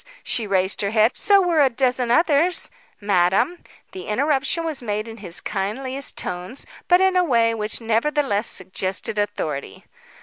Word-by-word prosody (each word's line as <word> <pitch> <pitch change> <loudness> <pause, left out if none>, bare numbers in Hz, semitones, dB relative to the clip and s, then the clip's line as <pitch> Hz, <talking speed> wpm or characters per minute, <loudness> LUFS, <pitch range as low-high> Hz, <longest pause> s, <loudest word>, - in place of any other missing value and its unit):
She 225 -3 -1
raised 190 -1 0
her 200 - 0
head. 220 +2 +3
"So 400 -1 +4
were 345 -3 +1
a 275 - +5
dozen 250 0 0
others 325 - +2
" - - -33
"Madam," 200 - +1 0.3
the 375 0 -9
interruption 275 +7 0
was 315 -5 -3
made 215 -1 -3
in 225 0 -9
his 180 -5 -4
kindliest 255 +7 -3
tones, 180 +8 -5 0.2
but 355 0 +5
in 380 0 +3
a 365 - +4
way 230 -7 +2
which 215 -1 -2
nevertheless 230 -1 0
suggested 190 +3 -1
authority. 150 - -4
230 Hz, 160 wpm, -22 LUFS, 205-295 Hz, 0.3 s, a